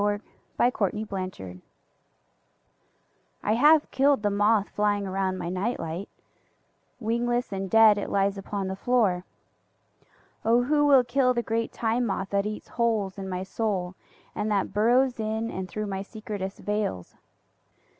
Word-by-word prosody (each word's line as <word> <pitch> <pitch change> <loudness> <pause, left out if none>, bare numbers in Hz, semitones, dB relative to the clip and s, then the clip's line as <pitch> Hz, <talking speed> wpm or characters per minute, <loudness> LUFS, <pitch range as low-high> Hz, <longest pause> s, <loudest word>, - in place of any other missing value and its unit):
1922. 215 -3 +1
Moth 185 0 -4
Terror 90 -1 -10 1.8
I 210 - +2
HAVE 300 +6 +5
killed 275 -4 +3
the 205 - +2
moth 205 0 +2
flying 205 -1 0
around 190 0 -1
my 170 - -4
night 185 +7 -2
light; 165 +4 -5 0.9
wingless 240 0 -1
and 195 0 -3
dead 220 0 +6
it - - -4
lies 200 0 +1
upon 195 0 -4
the 190 - -3
floor.(O 225 +2 -2
who 290 +2 +2
will 270 -3 +6
kill 250 +1 +2
the 235 - 0
great 230 0 -1
Time 235 +1 0
Moth 195 -1 -3
that 200 +1 +1
eats 210 0 -6
holes 220 -5 -1
in 190 -1 -5
my 185 0 -3
soul 190 -2 -2 0.4
and 215 - -2
that 200 -2 0
burrows 245 +4 +3
in 220 +1 -2
and 185 0 -5
through 215 0 -4
my 195 -1 -3
secretest 200 -2 -6
veils!) 205 - -3
210 Hz, 145 wpm, -26 LUFS, 195-235 Hz, 1.8 s, dead